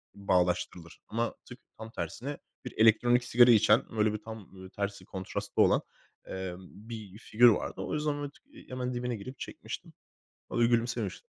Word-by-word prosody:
bağdaştırılır 90 -3 0
ama 115 +2 -1
tık 125 - -11 0.2
tam 110 0 -8
tersine 140 +5 -5 0.3
bir - - -6
elektronik 120 +2 +5
sigara 120 0 +6
içen 110 -2 +5
böyle 105 0 +3
bir - - -1
tam, 110 0 -7
ımm, 95 -2 -15
böyle 95 0 -10
tersi 100 0 -4
kontrastlı 95 -1 -2
olan, - - +5 0.4
emm, 95 -1 -5 0.3
bir 105 -4 -8
figür 120 +2 +5
vardı. 110 - -1
O - - -4
yüzden, 150 0 0
ooo, 145 -1 -4
t 295 - -18
hemen 125 0 -3
dibine 120 -1 -2
girip 130 +6 -9
çekmiştim. - - -7 0.6
O - - -3
da 120 - +6
gülümsemişti. 120 - 0
115 Hz, 170 wpm, -30 LUFS, 100-125 Hz, 0.6 s, sigara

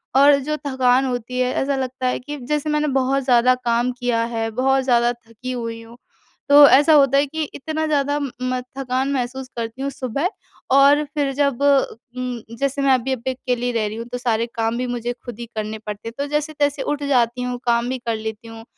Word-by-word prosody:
और 280 +1 +7
जो 305 +3 -2
थकान 260 -1 +3
होती 250 0 -3
है, 255 0 +1
ऐसा 275 +1 0
लगता 260 -1 -3
है 250 - 0
कि 290 +4 -7
जैसे 300 +4 -2
मैंने 300 0 +1
बहुत 270 0 +1
ज़्यादा 250 0 +4
काम 240 0 0
किया 240 -2 +1
है, 225 -1 -2
बहुत 265 +3 +1
ज़्यादा 240 -2 +3
थकी 235 +1 -9
हुई 230 -2 -4
हूँ, 230 +1 -14 0.5
तो 285 0 +9
ऐसा 290 +4 +6
होता 275 -2 +5
है 280 - +4
कि 315 +3 -4
इतना 315 +2 -3
ज़्यादा 285 -1 +1
म 255 -2 -3 0.2
थकान 265 +1 -1
महसूस 260 0 -3
करती 230 +3 -5
हूँ 275 - -1
सुबह 275 +6 -2 0.5
और 285 +2 +6
फिर 285 -2 0
जब 280 -2 0
उम, 255 -3 0 0.2
जैसे 275 0 -1
मैं 275 - +3
अभी 255 +1 0
यहाँ 260 -3 -2
पे 260 - +1
अकेली 245 -1 -2
रह 225 -2 0
रही 210 - -5
हूँ 230 - -5
तो 250 - -2
सारे 235 -2 0
काम 225 0 0
भी 250 0 -2
मुझे 245 0 -3
खुद 240 -3 -8
ही 235 - -5
करने 215 0 -3
पड़ते 210 +2 -6
हैं। 230 - -6
तो 285 - -1
जैसे-तैसे 295 -1 0
उठ 295 -1 -2
जाती 250 -3 +1
हूँ, 250 0 -3
काम 235 0 +1
भी 260 - -2
कर 230 - +1
लेती 220 +1 -6
हूँ 225 0 -10
255 Hz, 215 wpm, -21 LUFS, 235-275 Hz, 0.5 s, तो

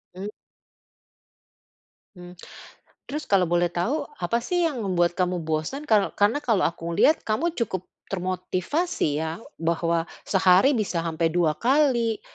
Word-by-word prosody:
Mmm. 195 +2 -5 1.9
Mmm. 180 0 -12 0.7
Terus 300 +2 -4
kalau 195 -2 +4
boleh 175 0 +2
tahu, 240 - -1 0.2
apa 175 +6 0
sih 355 +3 +1
yang 265 -6 -5
membuat 175 -2 +2
kamu 180 -1 0
bosan? 160 - -2
Kalau 210 -3 +3
karena 210 +8 +2
kalau 215 -6 +2
aku 165 0 -2
lihat, 315 - +4
kamu 310 +11 0
cukup 190 -6 -2 0.3
termotivasi 185 - -1
ya, 160 +6 -4 0.2
bahwa 165 0 0 0.2
sehari 190 +6 +5
bisa 195 -6 -1
sampai 165 0 0
2 165 -3 +1
kali, 245 -4 +2
185 Hz, 130 wpm, -25 LUFS, 170-235 Hz, 1.9 s, sehari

